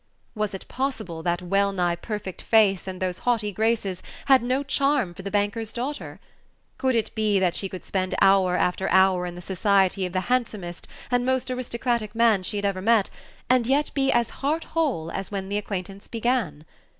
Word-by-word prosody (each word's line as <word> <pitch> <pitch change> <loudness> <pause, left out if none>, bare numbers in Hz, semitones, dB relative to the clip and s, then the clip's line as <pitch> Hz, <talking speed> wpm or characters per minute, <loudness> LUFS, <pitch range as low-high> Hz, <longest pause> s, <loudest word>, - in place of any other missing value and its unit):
Was 210 -3 -2
it 190 - -9
possible 220 -11 -3
that 175 +2 -1
wellnigh 195 -1 +1
perfect 190 +1 -5
face 200 -5 +3
and 185 -1 -5
those 185 -1 -2
haughty 225 -4 0
graces 215 -3 0 0.2
had 270 -2 +6
no 255 +3 0
charm 275 -8 +1
for 185 - -9
the 200 - -5
banker's 205 +2 -1
daughter? 270 +5 -5 0.6
Could 260 -2 +1
it 225 - 0
be 215 -2 +1
that 185 -2 +2
she 195 - -4
could 185 - -8
spend 185 -1 -1
hour 190 -2 +4
after 180 +2 0
hour 190 -1 +4
in 175 - -7
the 175 - -9
society 190 0 +2
of 180 - -10
the 185 - +1
handsomest 210 -7 -2 0.2
and 245 0 +2
most 260 0 0
aristocratic 235 -3 -2
man 225 -4 +4
she 205 +3 -3
had 200 - -2
ever 195 -2 -1
met, 220 -1 +3 0.4
and 255 -1 +4
Page 260 - +2
24 - - +5
yet 295 - -1
be 270 -1 +2
as 235 -1 +2
heart 305 +4 0
whole 260 - -1
as 195 -1 -4
when 195 -2 -4
the 205 - 0
acquaintance 195 -1 -6
began? 225 - -1
205 Hz, 195 wpm, -25 LUFS, 185-240 Hz, 0.6 s, had